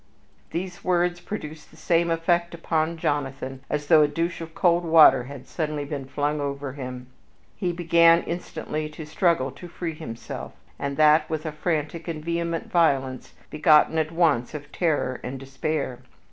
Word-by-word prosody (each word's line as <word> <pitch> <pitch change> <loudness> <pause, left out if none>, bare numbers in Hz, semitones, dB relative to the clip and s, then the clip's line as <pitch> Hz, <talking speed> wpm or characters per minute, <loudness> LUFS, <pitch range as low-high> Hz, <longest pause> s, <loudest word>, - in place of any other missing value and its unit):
These 180 +1 -5
words 175 -1 +1
produced 155 -7 -7
the - - -19
same 170 0 +1
effect 170 +1 +1
upon 165 0 -1
Jonathan 135 -3 -2
as 150 0 -2
though 155 0 +6
a 150 - +5
douche 170 +3 -2
of 165 0 -8
cold 175 -1 +3
water 160 -6 +6
had 140 -1 -9
suddenly 150 -3 -3
been 140 -2 -5
flung 145 +2 -1
over 140 -1 -4
him. 125 -2 -7 0.5
He 180 -3 -1
began 170 0 +4
instantly 155 -3 -4
to 155 0 -9
struggle 150 -4 +1
to 145 +6 -11
free 170 -1 -5
himself, 115 -6 -7 0.3
and 140 0 -3
that 155 0 +5
with 155 0 -3
a 155 - -2
frantic 155 +1 -2
and 155 -2 -5
vehement 170 0 -2
violence 135 -7 +1 0.2
begotten 155 +1 +4
at 155 0 -1
once 155 -7 +1
of 145 -1 -8
terror 150 -7 0
and 130 +1 -5
despair. 135 -1 -3
155 Hz, 160 wpm, -25 LUFS, 140-170 Hz, 0.5 s, though